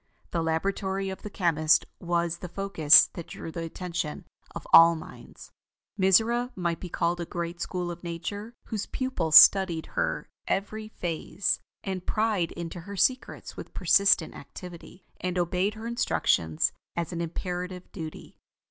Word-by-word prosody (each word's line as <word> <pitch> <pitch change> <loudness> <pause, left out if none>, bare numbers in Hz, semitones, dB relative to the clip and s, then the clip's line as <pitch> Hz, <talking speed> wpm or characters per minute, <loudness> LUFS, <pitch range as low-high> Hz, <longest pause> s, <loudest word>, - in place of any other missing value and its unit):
The 170 - 0
Laboratory 190 +4 -1
of 190 - -8
the 210 - -7
Chemist 155 -5 +2
was 170 -1 -1
the 180 - -7
focus 180 -5 +6
that 170 - -8
drew 165 - -8
the 165 - -5
attention 165 -2 -4 0.3
of - - -7
all 165 0 +9
minds. 160 - -12 0.4
Mizora 225 +5 +3
might 170 -2 -2
be 180 - -7
called 175 +1 -1
a - - -3
great 170 0 -5
school 180 0 -3
of 175 +1 -10
Nature, 200 +7 -6
whose 215 -3 -4
pupils 185 -12 -1
studied 185 -5 +8
her - - -1 0.2
every 215 +2 -2
phase, 180 -1 -2 0.2
and 190 -2 -4
pried 215 -6 0
into 170 +1 -6
her 200 +4 -8
secrets 255 +7 0
with - - -10
persistent 200 -5 +3
activity, 180 +4 -11
and 180 0 -3
obeyed 180 +4 0
her 220 +1 -8
instructions 85 - +1 0.2
as 170 +1 -3
an 170 - -3
imperative 180 +2 -5
duty. 160 -4 -9
180 Hz, 150 wpm, -27 LUFS, 170-195 Hz, 0.4 s, all